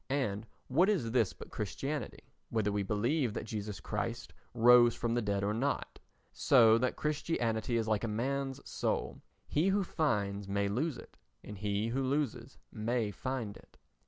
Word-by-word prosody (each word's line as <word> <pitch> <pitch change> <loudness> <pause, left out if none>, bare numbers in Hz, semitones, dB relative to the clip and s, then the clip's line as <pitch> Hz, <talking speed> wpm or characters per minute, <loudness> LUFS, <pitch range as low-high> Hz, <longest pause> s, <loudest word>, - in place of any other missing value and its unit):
And 115 -6 -1 0.2
what 170 +10 +3
is 145 - +1
this 115 -5 +2
but - - -12
Christianity, 135 +5 -4 0.2
whether 110 -3 0
we 100 0 0
believe 115 +5 0
that - - -3
Jesus 105 -2 -5
Christ 115 +2 -4 0.2
rose 120 0 +7
from 120 -1 -1
the 120 - +1
dead 100 -2 -1
or 105 +1 +1
not? 135 +6 -2 0.3
So 115 -4 +5
that 125 +1 0
Christianity 120 -7 -1
is 115 -1 -1
like 110 -1 +1
a - - 0
man's 135 +5 -2
soul—he 155 +5 -2
who 195 +1 +2
finds 100 - -1
may 100 0 0
lose 130 +8 -1
it - - -13 0.3
and 105 - -8
he 105 +2 -1
who 130 +4 -1
loses 130 -2 -2
may 110 -1 -1
find 115 0 -4
it. - - -18
115 Hz, 160 wpm, -32 LUFS, 105-135 Hz, 0.3 s, rose